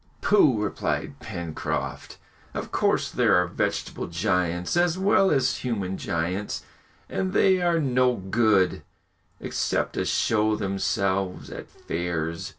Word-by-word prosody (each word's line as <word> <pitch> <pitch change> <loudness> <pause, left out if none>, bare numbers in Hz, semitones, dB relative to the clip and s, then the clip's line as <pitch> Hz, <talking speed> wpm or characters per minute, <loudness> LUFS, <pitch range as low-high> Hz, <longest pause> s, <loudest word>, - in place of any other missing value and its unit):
"Pooh!" 150 - +4
replied 105 -1 -2
Pencroft. 85 -2 -4 0.4
"Of - - -4
course - - +1
there - - +3
are 90 - +4
vegetable 85 - -2
giants 90 - 0
as 175 0 +2
well 195 0 +4
as 135 -3 +2
human 100 -7 -2
giants, 90 +5 -2 0.4
and 190 0 -2
they 190 -2 +4
are 170 -1 +2
no 125 -3 +2
good, 95 -1 +2 0.6
except - - -1
to - - -1
show 110 -1 +2
themselves 95 -1 -1
at - - -8
fairs!" 85 -1 -3
100 Hz, 120 wpm, -25 LUFS, 90-135 Hz, 0.6 s, Pooh